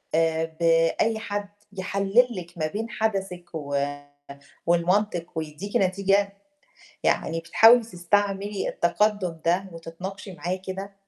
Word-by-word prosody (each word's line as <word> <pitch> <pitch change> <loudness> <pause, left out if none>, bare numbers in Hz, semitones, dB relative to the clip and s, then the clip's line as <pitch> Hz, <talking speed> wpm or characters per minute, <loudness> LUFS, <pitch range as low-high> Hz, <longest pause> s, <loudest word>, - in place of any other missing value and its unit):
آآ 160 0 +2
بأي 165 +7 +3
حد 205 -2 -4 0.2
يحلّل 200 +5 +2
لِك 175 -3 -8
ما 155 -1 0
بين 220 +7 -4
حَدَسِك 195 -5 -2
و 145 -3 -4 0.9
والمنطق 175 +1 +2
ويدّيكِ 160 +5 -4
نتيجة، 195 +1 +2 0.7
يعني 165 - +1
بتحاولي 225 +8 +7
تستعملي 200 +1 -1
التقدّم 185 -2 0
ده 180 +3 +2
وتتناقشي 180 +4 -8
معاه 180 +1 -3
كده؟ 190 +1 -7
190 Hz, 110 wpm, -25 LUFS, 170-205 Hz, 0.9 s, بتحاولي